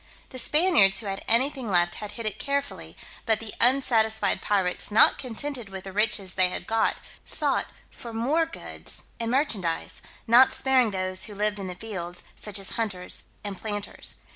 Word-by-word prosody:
The 255 - -4
Spaniards 295 - +4
who - - -10
had 195 -1 -4
anything 255 0 +2
left 175 -2 +3
had 210 -1 -6
hid 230 - -6
it 215 - -1
carefully: 280 0 -3 0.3
but 220 -1 +3
the 225 -2 -4
unsatisfied 225 -5 +3
pirates, 190 -3 0
not 210 - +5
contented 255 -2 -4
with 190 -1 -7
the 195 - -7
riches 205 -2 +1
they 185 -1 +3
had - - -5
got, 225 0 +1 0.3
sought - - +2 0.2
for 235 - -9
more 280 +9 +1
goods 330 - -4 0.2
and 230 -1 -1
merchandise, 220 - 0 0.2
not 245 +3 +7
sparing 260 -3 +3
those 185 -1 -1
who 210 - -9
lived 210 0 0
in 195 - -4
the 180 - -6
fields, 175 -5 -6
such 210 -1 -4
as 195 -1 -3
hunters 210 -6 -3 0.2
and 200 -2 -5
planters. 205 -2 -5
215 Hz, 170 wpm, -26 LUFS, 195-245 Hz, 0.3 s, not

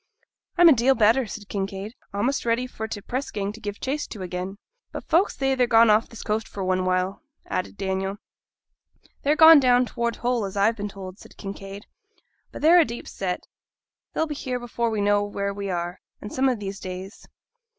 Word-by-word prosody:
'I'm 350 0 +8
a 320 - +9
deal 260 +2 +3
better,' 230 +3 +3
said 205 0 -8
Kinraid; 195 +1 -4 0.2
'a'most 235 +7 0
ready 235 +2 +1
for 220 -3 -6
t' 210 -2 -6
press 255 +6 -4
gang 200 -1 -3
to 220 - -11
give 205 -1 -6
chase 285 +3 -2
to 205 -4 -7
again.' 185 +2 -5 0.3
'But - - -6
folk 345 +5 +4
say 270 -1 0
they're 250 -2 +2
gone 230 -1 +6
off 215 +2 +3
this 230 - -9
coast 215 +1 -1
for 195 - -6
one 185 0 0
while,' 185 +1 0 0.2
added 185 - -3
Daniel. 190 0 -2 1.0
'They're 290 +2 +2
gone 320 0 +9
down 250 -1 +4
towards 235 -1 -2
Hull, 240 -3 0
as 195 +1 -6
I've 215 +3 +3
been 205 -1 -4
told,' 195 0 -9
said - - -16
Kinraid. 195 0 -8 0.7
'But - - -9
they're 340 +3 +7
a - - +7
deep 240 -5 -7
set, 180 -2 -4 0.7
they'll 320 - +1
be 305 - -4
here 255 -3 -3
before 235 -1 -2
we 215 -2 -1
know 205 0 +3
where 200 -1 -3
we 200 0 -5
are, 175 0 -3 0.3
some 265 +3 +1
of 250 - 0
these 200 -1 -6
days.' 185 +2 -8
210 Hz, 200 wpm, -24 LUFS, 195-250 Hz, 1.0 s, a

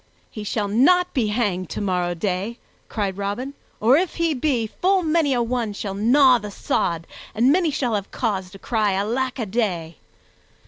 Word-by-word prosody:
"He 215 - -7
shall 210 0 -1
not 355 - +3
be 245 -6 +1
hanged 205 -5 -1
tomorrow 180 -3 -1
day," 195 +5 -2 0.3
cried 200 -3 -2
Robin; 205 +8 -3 0.3
"or, 240 +6 +5
if 360 +1 -1
he 335 -2 +1
be, 255 -4 0
full 370 - +1
many 315 -2 +2
a 245 -2 +2
one 230 -3 -2
shall 200 -1 -4
gnaw 250 +5 +5
the 210 -1 -7
sod, 170 -4 -1 0.3
and 240 +5 +4
many 340 +1 +3
shall 255 -5 -1
have 200 -2 -2
cause 195 -6 -2
to 195 - -12
cry 215 -1 0
Alack 240 +7 -1
a 235 - -2
day!" 185 -7 -2
225 Hz, 175 wpm, -22 LUFS, 200-265 Hz, 0.3 s, or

